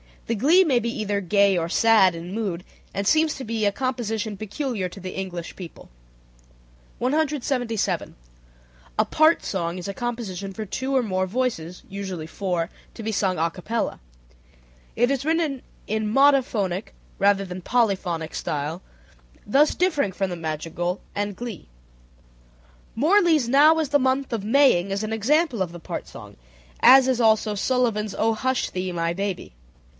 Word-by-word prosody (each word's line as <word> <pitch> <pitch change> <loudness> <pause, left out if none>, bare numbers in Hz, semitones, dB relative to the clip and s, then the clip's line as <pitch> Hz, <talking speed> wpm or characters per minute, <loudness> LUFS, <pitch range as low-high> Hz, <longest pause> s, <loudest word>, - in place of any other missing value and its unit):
The 230 - -1
glee 305 - +5
may 270 -8 +2
be 235 0 -2
either 210 -3 -2
gay 200 0 +3
or 165 -1 -1
sad 195 -1 +4
in 170 +3 -7
mood, 195 -6 -3 0.3
and 200 - -2
seems 315 +6 +3
to 270 - -7
be 225 -2 -2
a 205 - +3
composition 225 -3 -3
peculiar 215 -1 -3
to 180 - -11
the 185 0 -7
English 180 -3 -6
people. 175 -3 -10 1.1
177. 265 -5 -1 0.8
A - - +3
part 315 +2 +3
song 175 -2 -3
is 180 +2 -6
a - - -3
composition 200 -5 -4
for 215 +2 -5
two 265 +7 -3
or 260 - +3
more 185 -3 -1
voices, 185 -7 -3
(usually 190 -4 -5
four) 175 -1 -2 0.3
to 225 - -8
be 220 - -2
sung 190 -3 0
a 165 +1 +1
capella. 220 +6 -3 1.0
It 245 +3 +2
is 275 0 -1
written 315 -5 0 0.2
in 215 0 -2
monophonic 240 -8 +2 0.3
rather 200 0 +3
than 180 -2 -7
in - - -8
polyphonic 185 -8 0
style, 150 +4 -3 0.6
thus 285 +8 +3
differing 305 - +1
from 195 +1 -1
the 175 - -5
madrigal 165 +3 -3
and 205 -1 -2
glee. 235 -5 -7 1.3
Morley's 320 - +3
"Now 300 +5 +6
is 310 -4 -1
the 285 0 +3
Month 260 +1 0
of 210 -3 -3
Maying" 220 -7 +4
is 200 +2 -2
an 215 +1 -3
example 260 - +1
of 175 -2 -2
the 175 - -8
part - - -6
song, - - -12 0.4
as 265 0 +7
is 255 -2 +1
also 220 -1 +3
Sullivan's 215 -2 0
"O 225 +1 +2
Hush 260 +3 -1
Thee, 185 0 -3
My 170 0 -1
Baby." 195 - -4
215 Hz, 160 wpm, -24 LUFS, 185-260 Hz, 1.3 s, as